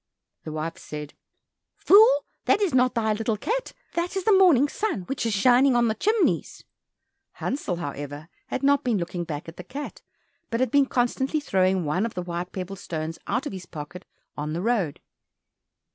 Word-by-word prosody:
The 155 Hz, -, -5 dB
wife 155 Hz, +1 st, -4 dB
said, 150 Hz, -1 st, -7 dB, 0.6 s
"Fool, 445 Hz, +5 st, +6 dB, 0.2 s
that 405 Hz, -, +4 dB
is 395 Hz, -8 st, +1 dB
not 255 Hz, 0 st, +3 dB
thy 220 Hz, -2 st, +1 dB
little 220 Hz, 0 st, -1 dB
cat, -, -, -2 dB, 0.2 s
that 345 Hz, +3 st, -2 dB
is 385 Hz, -, -1 dB
the 430 Hz, -, +4 dB
morning 350 Hz, -8 st, +6 dB
sun 395 Hz, -, -2 dB
which 260 Hz, +3 st, -2 dB
is 225 Hz, -, 0 dB
shining 250 Hz, +5 st, +5 dB
on 240 Hz, -1 st, +3 dB
the -, -, +1 dB
chimneys." 430 Hz, -, 0 dB, 0.7 s
Hansel, 260 Hz, -9 st, -3 dB
however, 145 Hz, -1 st, -6 dB, 0.2 s
had 260 Hz, -, -4 dB
not 280 Hz, 0 st, +4 dB
been 240 Hz, -4 st, +1 dB
looking 175 Hz, -1 st, -3 dB
back 155 Hz, -2 st, -5 dB
at 165 Hz, -, -10 dB
the 180 Hz, -, -7 dB
cat, 275 Hz, +9 st, -7 dB, 0.5 s
but 230 Hz, -, -1 dB
had 255 Hz, -2 st, +1 dB
been 280 Hz, -1 st, +4 dB
constantly 265 Hz, +5 st, 0 dB
throwing 190 Hz, -, +1 dB
one 180 Hz, +9 st, 0 dB
of 230 Hz, -, -11 dB
the 180 Hz, -, -3 dB
white 175 Hz, 0 st, -4 dB
pebble 190 Hz, +1 st, -5 dB
stones 160 Hz, -2 st, -5 dB
out 270 Hz, -, -1 dB
of 290 Hz, -, -4 dB
his 185 Hz, -2 st, -8 dB
pocket 160 Hz, +5 st, -8 dB, 0.3 s
on 150 Hz, +1 st, -3 dB
the 170 Hz, -, -2 dB
road. 205 Hz, -11 st, 0 dB
220 Hz, 185 wpm, -25 LUFS, 170-280 Hz, 0.7 s, Fool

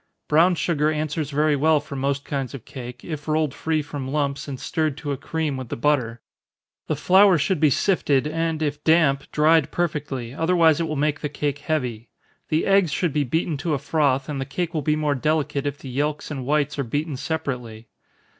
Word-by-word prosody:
Brown 170 Hz, +4 st, +4 dB
sugar 155 Hz, -3 st, +1 dB
answers 155 Hz, -1 st, -2 dB
very 150 Hz, +1 st, +2 dB
well 155 Hz, +2 st, +3 dB
for 145 Hz, -1 st, -9 dB
most 140 Hz, +1 st, -1 dB
kinds 135 Hz, -1 st, -3 dB
of 125 Hz, -, -10 dB
cake, 125 Hz, -2 st, -9 dB
if 150 Hz, -3 st, -6 dB
rolled 155 Hz, -2 st, +1 dB
free 155 Hz, 0 st, -1 dB
from 145 Hz, -2 st, -6 dB
lumps, 140 Hz, 0 st, -1 dB
and 135 Hz, -3 st, -5 dB
stirred 155 Hz, -3 st, -1 dB
to 145 Hz, -2 st, -4 dB
a -, -, 0 dB
cream 155 Hz, 0 st, -3 dB
with 130 Hz, -3 st, -7 dB
the -, -, -3 dB
butter. 120 Hz, -4 st, 0 dB, 0.7 s
The -, -, 0 dB
flour 190 Hz, 0 st, +5 dB
should 165 Hz, +3 st, 0 dB
be 155 Hz, -1 st, +5 dB
sifted, 145 Hz, -3 st, +2 dB
and 160 Hz, 0 st, -1 dB
if 145 Hz, 0 st, -3 dB
damp, 155 Hz, -4 st, +3 dB
dried 155 Hz, -1 st, +4 dB
perfectly, 145 Hz, -8 st, -3 dB
otherwise 165 Hz, 0 st, +3 dB
it 165 Hz, -, 0 dB
will 155 Hz, -, -3 dB
make 150 Hz, +1 st, 0 dB
the 150 Hz, -, -3 dB
cake 145 Hz, -1 st, -2 dB
heavy. 125 Hz, -7 st, -3 dB, 0.4 s
The 155 Hz, +1 st, +1 dB
eggs 195 Hz, -5 st, +3 dB
should 170 Hz, -1 st, 0 dB
be 150 Hz, 0 st, +2 dB
beaten 160 Hz, +4 st, -1 dB
to 155 Hz, +2 st, -1 dB
a -, -, 0 dB
froth; 140 Hz, -2 st, +1 dB
and 145 Hz, -3 st, -3 dB
the -, -, 0 dB
cake 170 Hz, +5 st, -3 dB
will 155 Hz, -, -1 dB
be 150 Hz, +1 st, +1 dB
more 150 Hz, -1 st, +1 dB
delicate 145 Hz, 0 st, 0 dB
if 145 Hz, 0 st, -3 dB
the 135 Hz, -, -9 dB
yelks 150 Hz, +4 st, -2 dB
and 130 Hz, -4 st, -5 dB
whites 150 Hz, 0 st, +1 dB
are -, -, +1 dB
beaten 145 Hz, +5 st, -2 dB
separately. 125 Hz, -6 st, -4 dB
150 Hz, 205 wpm, -23 LUFS, 140-160 Hz, 0.7 s, flour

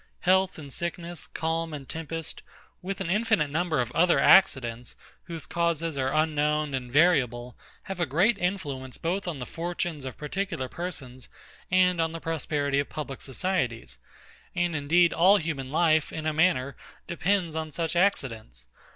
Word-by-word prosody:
Health 190 Hz, +1 st, +3 dB
and 140 Hz, -4 st, -9 dB
sickness, 170 Hz, -1 st, -4 dB
calm 165 Hz, 0 st, -2 dB
and 140 Hz, -2 st, -9 dB
tempest, 165 Hz, 0 st, -5 dB, 0.4 s
with 190 Hz, +1 st, -4 dB
an 170 Hz, -, -2 dB
infinite 210 Hz, -7 st, +2 dB
number 160 Hz, -1 st, 0 dB
of 120 Hz, -1 st, -3 dB
other 175 Hz, +5 st, +3 dB
accidents, 125 Hz, -11 st, +4 dB, 0.3 s
whose 165 Hz, -2 st, -6 dB
causes 165 Hz, -2 st, -1 dB
are 135 Hz, -1 st, 0 dB
unknown 150 Hz, -1 st, +1 dB
and 125 Hz, -2 st, -4 dB
variable, 125 Hz, -6 st, +2 dB, 0.3 s
have 195 Hz, -3 st, -6 dB
a 175 Hz, -, +1 dB
great 190 Hz, -, +2 dB
influence 145 Hz, -9 st, -3 dB
both 180 Hz, +3 st, -2 dB
on 170 Hz, -4 st, -3 dB
the 125 Hz, -, -5 dB
fortunes 170 Hz, -2 st, -4 dB
of 130 Hz, -2 st, -7 dB
particular 170 Hz, -2 st, -3 dB
persons 130 Hz, -6 st, -7 dB, 0.4 s
and 180 Hz, -1 st, +3 dB
on 160 Hz, 0 st, 0 dB
the 165 Hz, -, -5 dB
prosperity 145 Hz, -3 st, -1 dB
of 140 Hz, -, -2 dB
public 140 Hz, -3 st, -6 dB
societies; 130 Hz, -5 st, -2 dB, 0.6 s
and 175 Hz, -2 st, 0 dB
indeed 165 Hz, +4 st, +3 dB
all 190 Hz, +5 st, +6 dB
human 145 Hz, -7 st, -4 dB
life, 155 Hz, -1 st, +3 dB
in 160 Hz, -1 st, -5 dB
a 155 Hz, -, +1 dB
manner, 150 Hz, -5 st, +2 dB, 0.3 s
depends 170 Hz, 0 st, 0 dB
on 160 Hz, -1 st, -3 dB
such 165 Hz, +2 st, -3 dB
accidents. 125 Hz, -, 0 dB
160 Hz, 155 wpm, -27 LUFS, 140-175 Hz, 0.6 s, all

